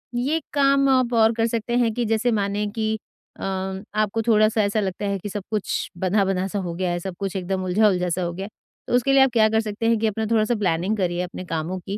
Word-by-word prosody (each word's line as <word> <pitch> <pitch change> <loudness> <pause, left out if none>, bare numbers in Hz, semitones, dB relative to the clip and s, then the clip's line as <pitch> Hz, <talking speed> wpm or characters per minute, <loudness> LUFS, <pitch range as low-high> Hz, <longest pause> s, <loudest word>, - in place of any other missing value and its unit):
ये 285 +7 0
काम 275 -1 +3
आप 255 -2 +2
और 225 -1 +5
कर 225 0 +1
सकते 230 +1 -2
हैं 235 -2 +2
कि 240 +1 -1
जैसे 225 +2 +1
माने 205 -1 0
कि 220 -1 0 0.5
अम, 190 +1 -3
आपको 215 +1 +1
थोड़ा 215 -2 +4
सा 220 -1 +1
ऐसा 205 +2 0
लगता 195 0 -3
है 200 0 -1
कि 205 - -6
सब 200 -1 -5
कुछ 210 -3 -2
बँधा-बँधा 190 0 +1
सा 200 +1 -3
हो 175 -3 -4
गया 180 0 -1
है, 175 - -1
सब 185 0 -6
कुछ 195 -1 -3
एकदम 190 0 -2
उलझा-उलझा 185 -1 +2
सा 180 +2 -1
हो 170 0 -2
गया 190 +2 -5
है, - - -9 0.4
तो - - -3
उसके 260 +2 +2
लिए 275 - +6
आप 265 - +3
क्या 220 -2 +5
कर 220 0 +2
सकते 215 +1 -4
हैं 230 - +3
कि 220 - +1
अपना 220 +1 -2
थोड़ा 220 -1 +4
सा 240 - 0
प्लानिंग 190 +1 0
करिए 175 -2 0
अपने 180 0 -7
कामों 165 +3 -3
की 195 +3 -5
210 Hz, 255 wpm, -23 LUFS, 185-225 Hz, 0.5 s, लिए